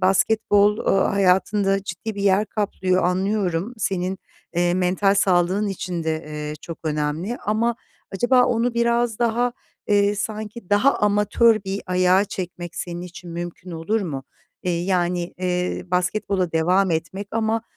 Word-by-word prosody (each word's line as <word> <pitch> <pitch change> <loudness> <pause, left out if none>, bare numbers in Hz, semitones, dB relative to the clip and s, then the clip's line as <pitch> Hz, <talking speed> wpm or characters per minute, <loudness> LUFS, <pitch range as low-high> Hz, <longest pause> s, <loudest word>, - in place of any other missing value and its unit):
basketbol, 205 +2 +3
ııı, 195 - +2
hayatında 195 +1 +2
ciddi 200 +4 -5
bir 200 - -4
yer 200 +1 +3
kaplıyor, 190 -3 0
anlıyorum. 190 +2 0
Senin, 190 -2 -1 0.4
eee, 175 0 +2
mental 185 +2 +2
sağlığın 190 +1 +2
için 180 -3 -4
de, 160 0 -2
eee, 150 0 -5
çok 165 - -7
önemli 155 +8 -2
ama 225 +3 +1 0.4
acaba 245 +5 +4
onu 235 0 0
biraz 235 -1 +1
daha, 240 +1 +1 0.4
eee, 205 0 +3
sanki 215 0 -5
daha 215 +7 +4
amatör 210 +1 +3
bir 195 +1 -3
ayağa 185 +2 +3
çekmek 175 -3 -6
senin 175 -1 -5
için 180 -1 -10
mümkün 175 +1 -6
olur 170 +7 -1
mu? 140 -8 -4 0.4
Eee, 180 - -1
yani, 180 -2 0
eee, 180 -1 -1
basketbola 180 0 0
devam 180 +4 +2
etmek 170 +5 -3
ama, 225 0 0
195 Hz, 140 wpm, -22 LUFS, 180-210 Hz, 0.4 s, acaba